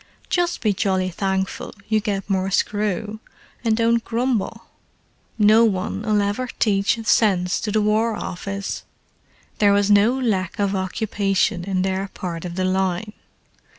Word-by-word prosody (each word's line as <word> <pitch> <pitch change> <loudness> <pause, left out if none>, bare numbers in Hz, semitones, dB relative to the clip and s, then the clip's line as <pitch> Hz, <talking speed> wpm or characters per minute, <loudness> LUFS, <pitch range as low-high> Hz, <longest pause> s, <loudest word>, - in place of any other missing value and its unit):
"Just 350 -1 0
be 215 -3 +2
jolly 185 -1 0
thankful 190 +1 -2
you 220 -1 +2
get 200 -2 -3
more 190 -1 0
screw, 210 +1 -1 0.4
and 225 -2 +2
don't 230 0 +2
grumble. 230 -2 -1 0.7
No 215 +1 +6
one'll 210 +1 0
ever 205 +6 -2
teach 200 0 +2
sense 185 -5 +2
to 210 - -2
the 215 0 +2
War 215 +2 +2
Office!" 195 +1 -5 0.8
There 205 -1 +5
was 205 0 +2
no 210 +5 +5
lack 195 -8 -1
of 200 -1 +1
occupation 195 -1 0
in 190 -2 0
their 190 +1 -1
part 175 -3 -6
of 175 -1 -5
the 185 0 0
line. 190 +2 -1
200 Hz, 140 wpm, -22 LUFS, 190-220 Hz, 0.8 s, No